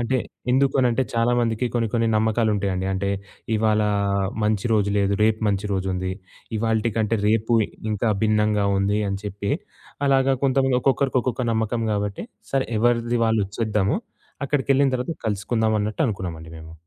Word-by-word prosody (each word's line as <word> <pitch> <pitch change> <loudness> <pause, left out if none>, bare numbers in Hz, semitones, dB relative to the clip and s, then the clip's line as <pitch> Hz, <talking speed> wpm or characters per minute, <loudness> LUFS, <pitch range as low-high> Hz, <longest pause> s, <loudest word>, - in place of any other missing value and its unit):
అంటే 130 +2 0 0.3
ఎందుకు 135 +2 +3
అనంటే, 125 0 +2
చాలామందికి 120 0 +1
కొన్ని 115 -1 +1
కొన్ని 115 -1 +1
నమ్మకాలుంటాయండి. 105 -4 0
అంటే 100 +1 -1 0.5
ఇవాళ 110 0 +2 0.6
మంచి 105 0 0
రోజు 105 -2 +2
లేదు, 100 0 +1
రేపు 110 0 +2
మంచి 100 +1 -1
రోజుంది. 95 -1 -2 0.5
ఇవాల్టికంటే 110 0 0
రేపు 110 +2 +2 0.4
ఇంకా 110 +2 0
భిన్నంగా 105 -1 +2
ఉంది 100 +2 +1
అని 100 0 -3
చెప్పి, 100 0 -3 0.5
అలాగా 135 0 +3
కొంతమంది 135 -1 +2
ఒక్కొక్కరికి 135 0 +2
ఒక్కొక్క 125 0 -2
నమ్మకం 110 +1 -1
గాబట్టి, 105 - -2 0.3
సరే 135 -1 +1
ఎవరిది 120 +1 +2
వాళ్ళు 110 -2 +2
ఇ - - -16
చేద్దాము 105 - +1 0.5
అక్కడికెళ్ళిన 140 -1 +2
తర్వాత 125 +6 -3
కలుసుకుందామన్నట్టు 110 - 0
అనుకున్నామండి 85 -6 -5
మేము. 80 0 -11
110 Hz, 135 wpm, -23 LUFS, 100-120 Hz, 0.6 s, ఎందుకు